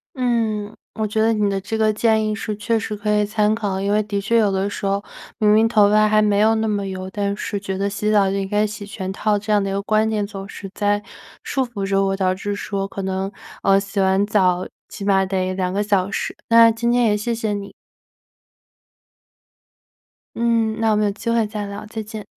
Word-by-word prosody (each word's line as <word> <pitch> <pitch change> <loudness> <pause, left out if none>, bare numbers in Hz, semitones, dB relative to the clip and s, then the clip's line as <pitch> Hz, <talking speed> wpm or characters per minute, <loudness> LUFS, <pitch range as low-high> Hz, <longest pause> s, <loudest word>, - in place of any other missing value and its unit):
嗯， 225 -4 -1 0.2
我 220 - -1
觉 215 +1 -1
得 225 +1 +3
你 210 -2 +1
的 195 0 -1
这 205 +4 -4
个 215 -1 +3
建 220 0 +2
议 215 - -1
是 215 -1 -4
确 225 +2 0
实 210 0 -4
可 210 +1 0
以 210 0 +3
参 210 0 +1
考。 200 -4 -2
因 200 +1 0
为 210 +1 +3
的 200 -1 -2
确 215 +4 +1
有 210 -3 +3
的 195 +1 0
时 205 - -6
候 200 +1 0 0.4
明 210 -2 +4
明 220 +1 +5
头 210 -3 +4
发 215 0 +4
还 215 0 +4
没 205 -1 +2
有 220 +1 +4
那 220 0 0
么 205 -2 -1
油， 185 -1 -5
但 200 0 -2
是 205 0 -3
觉 195 -1 -4
得 200 +1 0
洗 205 +1 -2
澡 200 -2 +4
就 195 - -1
应 195 -1 -2
该 210 +1 +2
洗 210 0 -7
全 195 -2 -5
套， 210 +1 0
这 215 +1 -3
样 205 -1 +3
的 195 - -2
一 - - -2
个 195 - -1
观 215 +1 +2
点 210 -2 -1
总 195 -1 -8
是 195 - -8
在 205 0 0 0.4
束 265 -1 -1
缚 205 -5 -4
着 195 0 +2
我， 195 0 0
导 185 -1 +1
致 205 +2 -4
说 195 -1 -3
可 195 - -6
能 190 0 -2 0.3
呃， 195 0 +4
洗 195 +1 -3
完 190 +1 +2
澡 185 -3 +2 0.2
起 200 - -8
码 195 -1 +3
得 185 -1 -1
2 185 -1 -1
个 200 +2 0
小 200 -2 +1
时， - - -3
那 230 0 +7
今 230 +1 -1
天 245 0 +3
也 210 -2 +3
谢 230 +3 -2
谢 225 -2 -2
你。 200 -1 -5 2.6
嗯， 230 -1 +1
那 225 -1 +2
我 - - +2
们 210 - +2
有 - - +1
机 225 +3 -4
会 230 -1 +2
再 210 -1 -5
聊， 200 +1 -7
再 220 +1 -5
见。 215 -1 -8
205 Hz, 250 characters per minute, -21 LUFS, 195-220 Hz, 2.6 s, 那